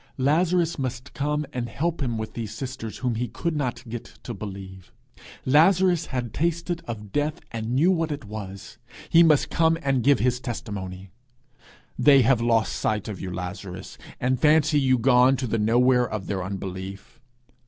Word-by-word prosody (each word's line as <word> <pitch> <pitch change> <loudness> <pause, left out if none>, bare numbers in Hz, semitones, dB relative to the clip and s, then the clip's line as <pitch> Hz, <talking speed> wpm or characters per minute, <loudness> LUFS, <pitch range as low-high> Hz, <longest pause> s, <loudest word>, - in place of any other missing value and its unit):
Lazarus 165 +4 +2
must 130 0 -4
come 150 +1 -1
and 120 -2 -3
help 165 +2 -2
him 120 -4 -1
with 110 0 -5
these 115 -3 -5
sisters 130 -5 -6
whom 125 -2 -1
he 120 +2 -2
could 170 +4 -3
not 125 -3 -3
get 115 0 -6 0.2
to 120 - -5
believe! 95 -2 -9 0.5
Lazarus 170 +4 +4
had 125 -4 -4
tasted 170 +2 -1
of 105 -3 -6
death, 150 +1 -1
and 115 +1 -3
knew 165 +8 +4
what 165 -3 0
it 145 -5 -5
was: 100 -2 -8 0.3
he 165 - +7
must 155 -4 +4
come 165 0 +3
and 135 -2 +1
give 140 +4 +4
his 125 +3 +1
testimony! 100 -7 -6 0.9
'They 140 -3 +6
have 125 -1 +3
lost 115 -2 +2
sight 110 0 -1
of 105 -4 -6
you, 95 - -5
Lazarus, 90 +1 -7 0.2
and 125 +1 0
fancy 155 -1 +4
you 130 -2 +3
gone 125 +2 +5
to 130 - -2
the 115 -1 -1
nowhere 125 +3 +3
of 105 -3 -4
their 95 -2 -2
unbelief. 95 +1 -7
125 Hz, 170 wpm, -25 LUFS, 105-150 Hz, 0.9 s, he